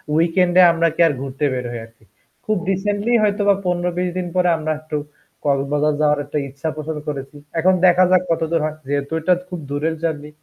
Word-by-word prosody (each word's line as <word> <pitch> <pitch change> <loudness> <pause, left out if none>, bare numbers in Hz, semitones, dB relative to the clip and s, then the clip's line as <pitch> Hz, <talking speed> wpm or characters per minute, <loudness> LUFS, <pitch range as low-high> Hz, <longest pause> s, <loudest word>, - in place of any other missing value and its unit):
উইকেন্ডে 175 +2 +4
আমরা 165 0 +2
কি - - +1
আর 150 - 0
ঘুরতে 140 +2 -3
বের 125 -1 -3
হয় 120 -1 -5
আরকি। 115 -1 -24 0.4
খুব 215 -2 +1
রিসেন্টলি 205 +4 -1
হয়তোবা 205 -1 +3
১৫-২০ 180 0 -1
দিন 180 -1 -2
পরে 180 -1 +3
আমরা 155 0 -2
একটু 155 -1 -4 0.5
কক্সবাজার 145 +2 +1
যাওয়ার 150 -1 +3
একটা 145 +2 -4
ইচ্ছা 140 +4 -4
পোষণ 155 0 -5
করেছি। 140 0 -5 0.2
এখন 185 +3 +4
দেখা 180 +1 +6
যাক 185 -1 +4
কত 165 - 0
দূর 165 - +2
হয়, 155 0 -4
যেহেতু 140 +2 -2
এটা 180 +3 +3 0.2
খুব 180 -2 -5
দূরের 155 +3 -1
জার্নি 150 -2 -2
160 Hz, 190 wpm, -20 LUFS, 145-180 Hz, 0.5 s, দেখা